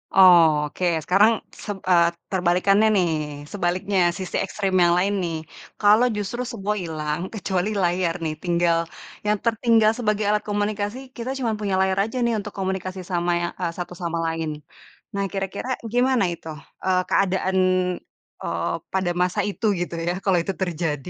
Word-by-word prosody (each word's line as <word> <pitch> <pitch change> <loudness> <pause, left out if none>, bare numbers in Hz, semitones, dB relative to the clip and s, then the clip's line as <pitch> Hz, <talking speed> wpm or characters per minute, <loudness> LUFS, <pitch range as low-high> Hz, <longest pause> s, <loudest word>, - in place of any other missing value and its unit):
Oke, 165 -4 +5 0.2
sekarang 210 +5 +5 0.3
seb 205 -2 -4
eee, 170 -1 +5 0.2
terbalikannya 190 +4 +3
nih. 180 -3 +3 0.4
Sebaliknya, 190 +1 0 0.2
sisi 185 -2 -5
ekstrim 195 -1 -2
yang 170 0 +4
lain 200 +3 +1
nih. 165 -1 -2 0.4
Kalo 210 +3 +5
justru 210 +5 -3
semua 210 -2 -2
hilang, 155 -2 -3
kecuali 190 -1 -1
layar 175 -1 +1
nih, 155 - -1
tinggal 170 -1 +2 0.5
yang 210 0 +2
tertinggal 225 -1 +4
sebagai 210 -3 -1
alat 210 +1 +2
komunikasi, 205 +2 -1 0.2
kita 235 +2 -4
cuma 235 -4 -1
punya 200 -2 -1
layar 190 0 +1
aja 255 - -6
nih, 235 - +1
untuk 210 - -8
komunikasi 190 0 -3
sama 175 -1 0
ya 175 - 0
eee, 170 - 0
satu 175 0 -5
sama 170 -1 -2
lain. 165 -1 -2 0.6
Nah, 200 0 -1
kira-kira 195 +5 -4 0.2
gimana 250 -4 +3
itu, 165 -1 -10 0.4
eee, 185 -1 +3
keadaan, 190 -1 +1 0.8
eee, - - -2 0.2
pada 185 -2 +1
masa 180 0 +1
itu 220 - -5
gitu 175 -1 -3
ya, 175 - +1
kalau 190 -2 +3
itu 195 +3 -3
terjadi? 165 -3 -2
190 Hz, 155 wpm, -23 LUFS, 175-205 Hz, 0.8 s, Oke